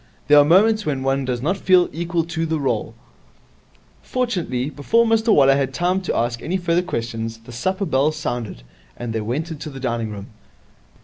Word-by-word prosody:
There 145 0 +8
are - - +7
moments 210 +8 +4
when 140 -6 -2
one 135 0 0
does 125 -1 -3
not 185 +6 0
feel 185 -2 +4
equal 170 0 -1
to 165 0 -3
the 160 -1 -1
role. 135 - -2 1.1
Fortunately, 175 - -2
before 225 +12 +2
Mr 225 0 +2
Waller 135 -7 +5
had 135 -1 -1
time 180 +2 +1
to 185 - -2
ask 120 0 -1
any 180 +4 -1
further 175 -1 +1
questions, 115 -7 -4
the 115 +2 -14
supper 185 - -2
bell 145 -1 +2
sounded, 120 - -5 0.3
and 120 -2 -5
they 110 - -1
went 140 +10 -3
into 155 0 -6
the 135 -2 -9
dining 120 -3 -2
room. 100 -1 -8
150 Hz, 185 wpm, -21 LUFS, 120-180 Hz, 1.1 s, There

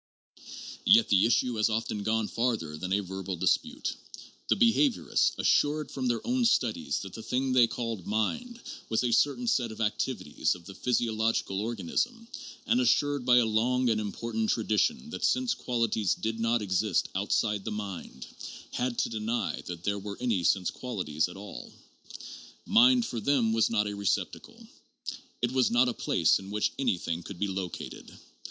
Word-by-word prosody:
Yet 225 +1 +6
the 100 +1 +5
issue 120 0 +1
has 105 +1 +3
often 110 -1 -2
gone 110 +1 0
further 115 -11 -1
than 90 +4 -5
a 100 +2 +2
verbal 95 0 -5
dispute. 85 - 0 0.5
The - - +3
behaviorists, 240 +2 +2
assured 150 0 +2
from 130 -2 -2
their 120 -1 -1
own 250 +1 +1
studies 110 - +1
that 95 - -8
the 110 - -7
thing 130 +3 -1
they 125 -2 +6
called 115 -5 -4
mind 235 - -2 0.3
was 110 +2 +1
a 120 - +1
certain 145 - +2
set 125 - +1
of 110 - -10
activities 105 - -1
of 85 -1 -14
the 100 - -9
physiological 110 -4 0
organ 110 -5 -4
ism, 235 -1 -1 0.4
and 245 +2 +2
assured 145 - +1
by 125 0 +6
a 120 - +5
long 120 +3 +2
and 110 -1 0
important 110 +1 -3
tradition 170 - 0
that - - -6
sense 255 -1 +2
quali 120 -2 -1
ties 105 -4 +1
did 110 0 -3
not 115 0 +1
exist 95 0 0
outside 105 +1 0
the - - -4
mind, 95 -11 -6 0.5
had 125 -1 -2
to - - 0
deny 110 0 -2
that 85 -1 -6
there 100 +1 -1
were 100 0 -7
any 115 -8 0
sense 90 +1 +2
qualities 90 -11 -2
at 90 - -10
all. 100 +1 -9 0.9
Mind 245 +2 +5
for 120 - -4
them 120 -2 +2
was 115 0 +3
not 105 -2 +1
a 105 - -3
receptacle: 100 -1 -3 0.8
it 120 - +2
was 130 -1 +3
not 125 +2 +3
a - - -2
place - - +2
in 95 0 -10
which 105 +1 0
anything 90 -9 -1
could 95 +2 -9
be 100 - -1
located. 95 -2 -6
110 Hz, 175 wpm, -29 LUFS, 100-125 Hz, 0.9 s, Yet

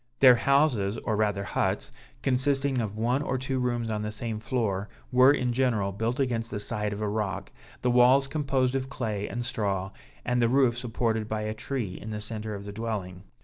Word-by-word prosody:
Their 130 -2 +9
houses, 120 -5 +2
or 110 -1 -2
rather 105 -2 0
huts, - - -1 0.3
consisting 135 0 +1
of 105 -1 -4
one 120 +5 +1
or 135 -3 -1
two 130 0 -2
rooms 120 -2 -1
on 105 -1 -2
the 105 0 -3
same 110 0 -4
floor, 110 -4 -1 0.2
were, 130 +2 +7
in 125 -4 0
general, 115 -6 +1
built 115 +6 -2
against 115 -4 0
the 105 - -4
side 105 0 +1
of 105 +1 -5
a - - 0
rock; 100 -2 -3 0.3
the 125 - +3
walls 125 +3 +6
composed 135 -3 0
of 135 0 -2
clay 110 -6 -3
and 120 0 -4
straw, 95 -4 -2 0.3
and 125 0 +1
the 115 - +3
roof 130 -2 +3
supported 115 -2 -1
by 110 0 -1
a 110 0 -2
tree 110 -4 -4
in 110 - -7
the 105 -1 -4
centre 110 0 -4
of 100 0 -8
the 100 - -7
dwelling. 100 -4 -4
115 Hz, 200 wpm, -27 LUFS, 105-130 Hz, 0.3 s, Their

